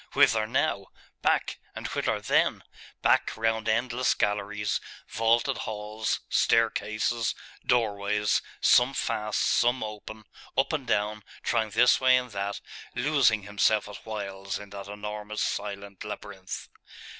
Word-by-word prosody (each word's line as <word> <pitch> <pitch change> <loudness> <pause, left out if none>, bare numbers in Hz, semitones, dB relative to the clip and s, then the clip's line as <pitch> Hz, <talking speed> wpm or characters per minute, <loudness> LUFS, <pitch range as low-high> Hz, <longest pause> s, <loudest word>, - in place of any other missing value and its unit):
Whither 110 -1 +4
now? 110 -6 0 0.3
Back - - +1 0.2
and - - -6
whither - - 0
then? - - +2 0.4
Back, - - +3
round 115 0 0
endless 120 +3 +1
galleries, 105 0 -1 0.3
vaulted 115 +3 +2
halls, 110 0 -3
staircases, 110 0 +1 0.3
doorways, 105 -3 +1 0.2
some 125 +3 +5
fast, 105 -3 -1
some 120 0 +2
open, 110 0 -7 0.3
up 135 +3 +2
and 140 -5 -2
down, 105 -1 0 0.2
trying 110 -2 +1
this 120 +5 +4
way 130 0 +6
and 125 -1 -3
that, 100 0 -3 0.3
losing 120 -5 +3
himself 105 +1 +2
at 105 - -8
whiles 100 -3 -4
in 100 -1 -11
that 100 -1 -7
enormous 105 +1 -4
silent 100 -1 -4
labyrinth. 100 -2 -7
110 Hz, 120 wpm, -28 LUFS, 105-115 Hz, 0.4 s, way